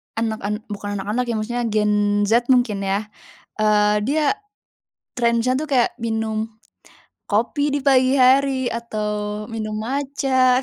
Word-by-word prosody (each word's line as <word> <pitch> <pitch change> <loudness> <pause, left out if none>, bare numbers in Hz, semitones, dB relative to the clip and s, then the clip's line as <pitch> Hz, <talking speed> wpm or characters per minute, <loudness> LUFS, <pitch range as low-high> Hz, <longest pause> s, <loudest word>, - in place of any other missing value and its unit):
anak 225 -1 -2
an 210 - -1 0.2
bukan 205 0 -4
anak-anak 215 +6 -1
ya, 230 - -1
maksudnya 240 +3 -2
Gen 210 -1 +1
Z 235 +1 +3
mungkin 245 -6 +2
ya, 200 +2 -1 0.5
eee, 210 0 +3
dia 290 - +1 0.8
trennya 235 +1 +1
tuh 310 0 -4
kayak 250 -3 +2
minum 220 -1 -2 0.8
kopi 265 +7 +1
di - - +1
pagi 260 -1 +4
hari 260 0 +4
atau 210 -2 -3
minum 215 -1 -4
matcha. 260 0 +1
230 Hz, 130 wpm, -21 LUFS, 210-255 Hz, 0.8 s, pagi